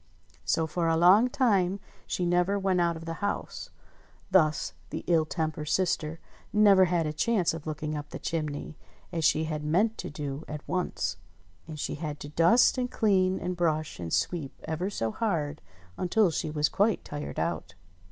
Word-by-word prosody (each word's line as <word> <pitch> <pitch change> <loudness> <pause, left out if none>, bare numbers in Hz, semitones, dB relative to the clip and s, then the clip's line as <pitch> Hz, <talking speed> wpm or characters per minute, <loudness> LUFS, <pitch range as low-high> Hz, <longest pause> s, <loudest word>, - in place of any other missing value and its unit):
So 160 - +1
for 165 +2 -1
a 165 0 +2
long 190 +9 +6
time 200 -8 +2 0.3
she 180 - -1
never 180 +3 +2
went 190 -2 +1
out 170 -1 +1
of 165 - -9
the 165 -1 -6
house; 205 0 -3 0.6
thus 155 -5 +3 0.2
the - - -5
ill 165 -3 +3
tempered 155 -2 -3
sister 165 -3 0 0.3
never 200 -3 +6
had 175 -2 +1
a 150 - -2
chance 185 0 +1
of 165 -1 -7
looking 155 0 -3
up 145 -1 -6
the - - -6
chimney, 155 -1 -4 0.3
as 165 -2 -2
she 155 +1 +3
had 155 -1 -3
meant 200 +9 +1
to - - -4
do 145 0 -5
at 150 -1 -7
once. 85 - -2 0.5
And 155 -2 -7
she - - -2
had 150 -2 -4
to 145 - -7
dust, 175 - +4
and 250 0 -1
clean, 190 -5 +2
and 180 0 -3
brush, 155 - -1
and 85 -2 -5
sweep 135 - -1
ever 160 +5 -2
so 115 - -2
hard, 155 - -2 0.4
until 185 +1 +3
she 155 - -2
was 150 -1 +1
quite 205 +6 +1
tired 145 0 -6
out. - - -2
165 Hz, 180 wpm, -28 LUFS, 150-185 Hz, 0.6 s, long